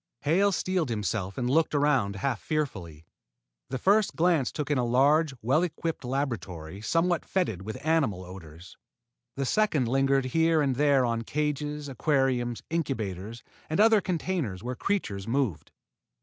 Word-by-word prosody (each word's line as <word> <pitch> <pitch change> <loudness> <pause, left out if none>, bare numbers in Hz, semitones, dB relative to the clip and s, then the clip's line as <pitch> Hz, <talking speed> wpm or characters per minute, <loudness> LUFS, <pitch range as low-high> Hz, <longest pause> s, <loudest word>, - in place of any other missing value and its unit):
Hale 190 +7 +3
steeled 185 -4 -1
himself 105 -3 -2
and 125 - -1
looked 155 +4 +2
around 135 -9 +2
half 120 +4 -2
fearfully. 95 - -3 0.6
The 130 - -2
first 200 - +2
glance 165 -6 +2
took 150 -1 -4
in 145 - +2
a - - +1
large 140 +5 +3
and 130 - -18
well 135 +8 +3
equipped 165 -2 -3
laboratory, 105 - -4
somewhat 165 +8 +1
fetid 170 - -1
with 110 +7 -7
animal 140 - +1
odors. 90 -1 -12 0.6
The 135 - -2
second 155 - +1
lingered 135 +1 +2
here 165 0 +3
and 140 -3 +1
there 140 -1 +3
on 115 -1 -1
cages, 150 +2 -2
aquariums, 130 -3 0
incubators, 115 - -3 0.3
and 160 - -1
other 220 -1 +6
containers 165 - -2
where 125 +1 -3
creatures 110 - -2
moved. 125 - -1
135 Hz, 150 wpm, -27 LUFS, 110-160 Hz, 0.6 s, other